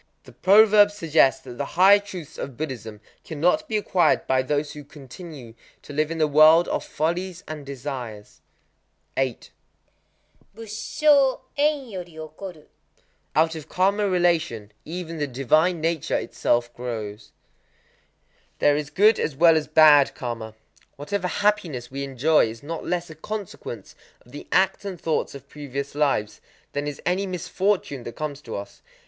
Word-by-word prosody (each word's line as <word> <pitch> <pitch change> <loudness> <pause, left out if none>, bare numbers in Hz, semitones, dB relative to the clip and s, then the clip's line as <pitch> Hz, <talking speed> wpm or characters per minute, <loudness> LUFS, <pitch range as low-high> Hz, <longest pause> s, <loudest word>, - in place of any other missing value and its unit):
The - - -15
proverb 205 +1 +6
suggests 160 -9 +2
that 125 -1 -10
the - - 0
higher 195 +3 +7
truths 180 -7 -9
of 135 -4 -6
Buddhism 115 -8 -6 0.2
cannot 175 - 0
be 220 - 0
acquired 180 -6 +2
by 130 0 +2
those 145 +2 -1
who 150 - -9
continue 140 -2 -11 0.3
to 145 - -10
live 155 +1 0
in 165 - -4
the 155 - +3
world 155 +3 +6
of - - -1
follies 175 +4 -3
and 155 -2 -6
desires. 125 -6 -7 0.7
8.—Busshō 225 - -2
en 290 -2 +1
yori 180 -6 -8
okoru. 155 +1 -9 0.7
Out 160 +1 +3
of 160 -3 -9
karma 200 +2 +1
relation 165 - 0
even 165 0 -6
the 145 - -1
divine 155 +7 +2
nature 165 -1 -1
itself 120 0 -1
grows. 110 -4 -6 1.3
There 145 - +3
is 150 -1 -3
good 210 +5 +4
as 150 - -2
well 165 +2 +6
as 155 -1 0
bad 150 -2 +6
karma. 115 -3 -6 0.4
Whatever 180 +6 -3
hap 210 +3 +2
piness 130 -11 -8
we 140 +1 -4
enjoy 140 +2 +2
is 115 +2 -9
not 165 +2 -5
less 175 -1 -3
a - - -10
consequence 165 - -7 0.3
of 120 - -19
the 145 - -10
acts 190 +1 +2
and 190 -4 -6
thoughts 160 -3 -1
of 140 0 -11
previous 140 -1 -6
lives, 135 -8 0 0.3
than 145 +1 -3
is 145 - -5
any 190 +2 0
misfortune 185 -4 -1
that 120 - -7
comes 150 -2 -5
to 115 - -7
us. 100 0 -8
155 Hz, 150 wpm, -24 LUFS, 135-185 Hz, 1.3 s, higher